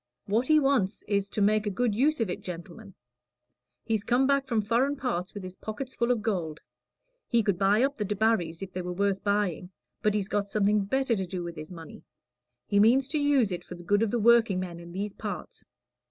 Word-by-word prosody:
What 225 +5 0
he 310 0 +6
wants 270 -9 +1
is, 200 -1 0
to 210 - -2
make 215 +1 +2
a - - +2
good 215 +2 0
use 290 +6 +2
of 225 - +1
it, 180 - -4
gentlemen. 185 +3 -9 0.9
He's 220 -3 -1
come 245 +3 +2
back 275 0 +2
from 230 -4 +1
foreign 245 +7 +1
parts 225 -10 -3
with 200 - -6
his 185 0 -8
pockets 255 +6 -6
full 235 +1 0
of 240 -4 +1
gold. 170 -8 -2 0.7
He 235 -2 +2
could 200 -4 0
buy 205 +4 +4
up 280 +1 0
the 210 - -1
Debarrys, 205 -5 0
if 190 -1 -8
they 185 - -3
were 180 0 -4
worth 200 +1 0
buying, 200 -4 0 0.3
but 210 -1 +1
he's 200 -2 -1
got 205 -1 -1
something 205 0 +2
better 265 +2 +1
to 190 -3 -3
do 180 -1 -4
with 170 -1 -6
his 155 +2 -9
money. 165 -3 -10 0.6
He 200 - +2
means 250 +5 +5
to 300 - 0
use 280 -8 +3
it 175 - -4
for 180 - -9
the 175 - -11
good 205 +4 +2
of 225 - +2
the 240 - 0
workingmen 205 -7 +3
in 170 0 -11
these 200 +3 -4
parts. - - -7
205 Hz, 220 wpm, -28 LUFS, 185-235 Hz, 0.9 s, he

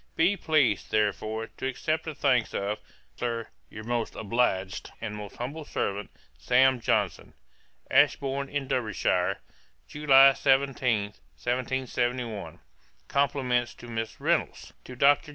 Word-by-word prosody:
'Be 180 +5 +3
pleased, 140 - +1
therefore, 110 +1 0
to 130 - -6
accept 155 +4 -2
the 160 -2 -5
thanks 130 -5 +1
of, 100 +2 -2 0.4
Sir, 115 -2 -3 0.2
your 110 - -9
most 120 0 -2
obliged 100 -4 -1
'And 110 -2 -5
most 105 -1 -8
humble 140 +6 -5
servant, 100 -7 -3 0.3
'SAM. 130 +1 +4
JOHNSON.' - - -1 0.6
'Ashbourn 140 -1 +2
in 140 -2 -3
Derbyshire, 110 -7 0 0.5
July 135 - +6
17, 130 -7 +1 0.3
1771. 125 -3 -2 0.5
'Compliments 125 -4 0
to 120 - -12
Miss 115 -2 -4
Reynolds,' - - -1
'To 125 - -9
DR. 140 +3 +5
125 Hz, 115 wpm, -27 LUFS, 110-135 Hz, 0.6 s, July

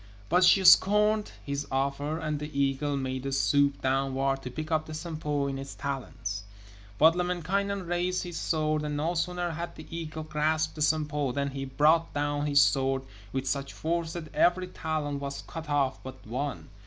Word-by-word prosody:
But 180 +2 +4
she 190 +2 +6
scorned 210 +3 +6
his 140 0 -3
offer, 140 +3 -1
and 155 -2 -2
the 150 +1 -5
eagle 140 +1 +1
made 130 -1 -3
a - - -2
swoop 140 +1 +2
downward 135 0 +1
to 125 - -6
pick 155 +5 -6
up 155 -1 +1
the 155 - -6
Sampo 155 -3 -2
in 135 -1 -3
its 135 0 -7
talons. 115 -7 -4 0.6
But 160 +2 +6
Lemminkainen 180 +2 -1
raised 175 +1 0
his 175 -2 -7
sword, 155 -1 0
and 150 -1 -3
no 160 +4 0
sooner 175 0 -1
had 170 +2 -5
the 155 - -10
eagle 160 -1 -5
grasped 155 +1 0
the 155 - -8
Sampo 150 -3 +1
than 140 0 -1
he 135 0 -4
brought 155 +5 +3
down 145 0 0
his 140 -1 +5
sword 135 -1 +2 0.3
with 130 +3 -2
such 140 +1 -2
force 165 0 -2
that 160 -3 -7
every 185 +1 +3
talon 155 -4 -3
was 140 0 -5
cut 165 -2 -7
off 140 -2 +1
but 130 0 -10
one. 130 +5 -4
150 Hz, 180 wpm, -28 LUFS, 140-165 Hz, 0.6 s, she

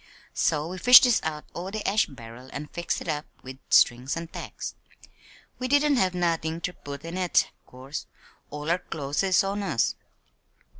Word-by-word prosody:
So 150 +1 +1
we 185 +2 -6
fished 250 +5 +9
dis 245 -3 +4
out 150 -1 -4
o' 180 +2 -5
de 215 +1 -4
ash 210 +3 +3
barrel 125 -1 -12
an' 150 +1 -6
fixed 170 -1 -3
it - - -8
up 150 -1 -2 0.2
wid 130 +1 -9
strings 125 +5 +4
an' 165 0 -6
tacks. - - -7 0.9
We 255 - -2
didn't 285 +1 +3
have 185 -4 +1
nothin' 165 -2 0
ter 180 +1 -3
put 140 -1 -9
in 170 +3 -4
it, 180 -2 +2 0.2
'course. 130 +3 -8 0.4
All 150 +2 -3
our 175 - +2
clo's 145 -5 -3
is 190 -1 +3
on 200 +1 -2
us." 190 - +1
165 Hz, 180 wpm, -26 LUFS, 145-190 Hz, 0.9 s, fished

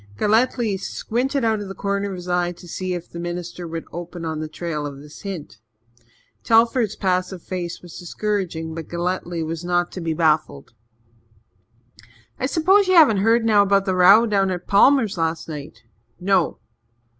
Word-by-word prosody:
Galletly 220 - +2
squinted 255 +6 -2
out 220 -1 +1
of 205 - -6
the 195 - -7
corner 200 0 -2
of 190 - -5
his 180 0 -9
eye 175 0 0
to 175 - -14
see 185 +2 -3
if 175 -1 -7
the 170 - -9
minister 175 0 -5
would 165 0 -5
open 175 0 -7
on 160 -1 -3
the 155 - -4
trail 155 -2 -4
of 140 -1 -8
this 150 +2 -13
hint. 175 - -7 0.8
Telford's 230 -1 +3
passive 185 -2 -1
face 180 -2 -5
was 175 - -10
discouraging 175 -3 -3
but 160 -1 -7
Galletly 175 -1 -3
was 165 +1 -5
not 175 0 0
to 185 - -7
be 165 -1 -2
baffled. 155 -5 0 1.7
"I 260 - 0
s'pose 375 +7 +3
ye 370 - +3
haven't 295 - +7
heard 225 +3 +3
about 200 -2 +4
the 190 - 0
row 195 +5 +7
down 200 -3 +1
at 180 -1 -4
Palmers' 215 -2 +4
last 160 0 -1
night?" 145 -7 -8 0.4
"No." 185 -2 +1
180 Hz, 165 wpm, -22 LUFS, 165-210 Hz, 1.7 s, haven't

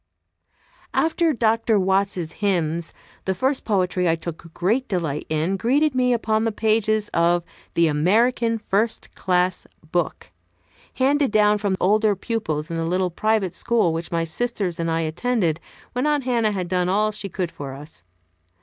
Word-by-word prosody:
After 325 0 +2
Dr. 225 -3 +2
Watts's 190 -3 0
hymns 170 -4 0 0.3
the 190 - 0
first 265 +7 0
poetry 180 -4 +1
I 165 - +3
took 165 0 -8
great 220 +11 0
delight 160 -6 -2
in 160 +5 0
greeted 275 +7 +2
me 250 -1 +2
upon 220 -2 +1
the 225 - +1
pages 215 0 +1
of 170 +1 +2 0.3
the 170 - +4
"American 225 +10 +2
First 215 +1 -1
Class 180 -1 0 0.2
Book," 175 -1 -2 0.6
handed 280 +2 +2
down 210 -1 +3
from 200 -2 0
older 210 +2 +3
pupils 180 -8 -3
in 165 - -2
the 165 - -1
little 180 +1 0
private 215 -1 0
school 225 -8 +1
which 165 +1 -4
my 165 -1 0
sisters 185 0 -2
and 165 0 -1
I 165 0 +1
attended 170 0 0 0.3
when 250 +4 0
Aunt 295 -2 +1
Hannah 235 -4 +1
had 185 -3 -3
done 180 0 0
all 210 +3 +2
she 210 -1 -6
could 180 -1 -3
for 135 -2 -7
us. 150 +3 -6
195 Hz, 160 wpm, -23 LUFS, 170-225 Hz, 0.6 s, the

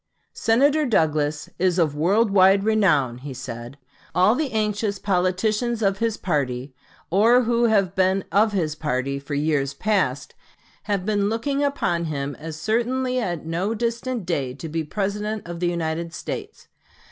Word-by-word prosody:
"Senator 280 +7 +3
Douglas 155 - +1
is 180 0 +2
of 160 -5 +2
world 200 +8 +2
wide 195 0 +5
renown," 170 - +2
he 135 0 -7
said. 120 0 -7 0.4
"All 185 +4 +5
the 280 +1 -1
anxious 210 -1 -1
politicians 210 +5 0
of 195 -1 +1
his 230 -2 0
party, 135 -6 -2 0.4
or 230 +7 +5
who 235 0 +2
have 200 -5 +2
been 190 0 +2
of 210 +4 +3
his 170 -7 -1
party 140 -2 -2
for 140 +1 -5
years 140 -2 0
past, 150 -9 0 0.5
have 200 -3 -1
been 205 -1 +1
looking 275 +6 -1
upon 175 -12 0
him 145 -2 -3
as 160 0 -7
certainly 250 +6 0
at 175 -9 -3
no 180 +7 -1
distant 235 -1 -2
day 140 -7 -2
to 160 - -7
be 160 +1 -2
the 155 - -8
President 210 +2 -3
of 170 -1 -6
the 175 - 0
United 165 -1 -3
States. - - -7
185 Hz, 160 wpm, -23 LUFS, 155-220 Hz, 0.5 s, wide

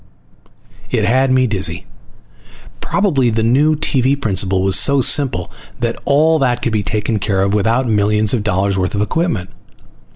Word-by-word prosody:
It - - 0
had 130 +2 +2
me 130 0 +3
dizzy. 95 -7 -2 0.9
Probably 145 - 0
the 110 0 -1
new 145 +7 +2
TV 140 -2 0
principle 95 -5 0
was 95 -1 +2
so 140 -1 +3
simple 130 - +1 0.3
that 120 -1 -3
all 155 +3 +2
that 125 -3 -1
could 115 - -1
be 105 - 0
taken 105 +1 -2
care 95 -1 -1
of 100 +1 -1
without 115 +5 0
millions 105 0 +1
of 120 - 0
dollars 100 -1 -1
worth 90 +2 -2
of 100 - -1
equipment. 130 - -2
115 Hz, 160 wpm, -16 LUFS, 100-135 Hz, 0.9 s, me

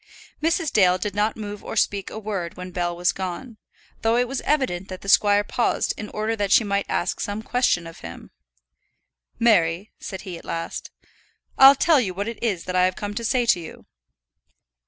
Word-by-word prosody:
Mrs. 325 0 0
Dale 185 -3 +4
did 205 +1 -3
not 210 +2 0
move 205 -1 -7
or - - -6
speak 200 -3 0
a - - -8
word 200 -5 -4
when 180 0 -7
Bell 175 -1 -2
was 175 +1 +2
gone, 195 +6 -6 0.4
though 225 +1 +2
it 245 0 +2
was 270 +1 -3
evident 255 -12 0
that 185 -1 -8
the - - -11
squire 205 0 +5
paused 235 +3 0
in 210 - -7
order 215 +1 -2
that 205 -3 -2
she 230 - +6
might 200 -1 -1
ask - - -1
some 205 +2 -4
question 245 -10 +1
of 165 0 -11
him. 85 0 -10 1.1
"Mary," 190 -4 +2
said 190 -2 -7
he, 180 -4 -7
at - - -16
last, 165 0 -5 0.7
"I'll 270 +1 +9
tell 310 +1 +4
you 190 -7 -2
what 200 +3 -3
it 230 -1 -6
is 200 -8 -1
that 185 - -5
I 180 0 +4
have 185 0 0
come 205 0 -5
to 230 +3 -4
say 245 +1 +1
to 185 - +3
you." 165 - -10
205 Hz, 200 wpm, -23 LUFS, 180-230 Hz, 1.1 s, I'll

